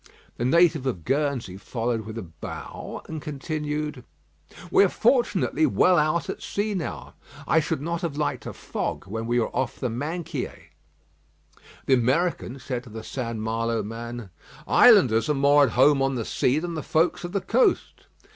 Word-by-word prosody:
The 120 - -1
native 160 -1 +3
of 90 -11 -3
Guernsey 135 - -1
followed 115 +1 -3
with 110 +1 -7
a 115 - -4
bow 80 -3 -8
and 160 -1 -6
continued: 150 +1 -4 0.7
"We 395 - +6
are - - +3
fortunately 325 -9 +2
well 180 -9 +4
out 155 +3 +1
at - - -5
sea 210 +1 -2
now; 180 -5 -5 0.3
I 160 - +4
should 155 -2 -2
not 170 +1 -2
have 160 -4 -3
liked 150 - -2
a - - -5
fog - - -4
when 115 +4 -5
we 120 +1 +2
were 115 - -2
off 130 - -2
the 125 - -2
Minquiers." 155 +8 -5 1.1
The 135 - +3
American 130 +2 +1
said 125 -2 -4
to - - -12
the 110 +1 -8
St. 115 -1 -4
Malo 115 +1 -1
man: 115 -1 -7 0.4
"Islanders 115 +4 +6
are 150 - +2
more 140 +1 +5
at 115 - -3
home 135 +2 +5
on 135 0 +1
the 115 -3 -3
sea 130 +3 +1
than 170 +2 -3
the 155 - -3
folks 160 +5 +1
of 175 - -5
the 200 - 0
coast." 225 +7 +1
135 Hz, 175 wpm, -25 LUFS, 115-160 Hz, 1.1 s, We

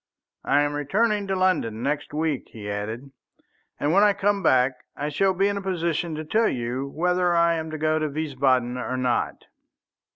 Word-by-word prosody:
"I 145 +1 +3
am 145 0 -1
returning 205 +8 0
to 195 - 0
London 180 - 0
next 145 +2 -2
week," 150 -2 -2
he 105 -2 -8
added, 110 +6 -5 0.7
"and 145 +2 +1
when 200 - +5
I 205 -1 +5
come 200 0 +1
back 125 -4 +2
I 145 +1 -3
shall 190 +6 +1
be 195 +2 +2
in 200 0 -1
a - - -3
position 170 -3 -1
to 155 +1 -5
tell 220 +8 +2
you 125 +2 -3
whether 180 +4 +1
I 170 0 +4
am 160 -1 -3
to 155 - -5
go 155 +1 +1
to 155 -1 -1
Wiesbaden 130 -4 0
or 130 +1 -3
not." 125 -1 -1
155 Hz, 190 wpm, -24 LUFS, 130-185 Hz, 0.7 s, when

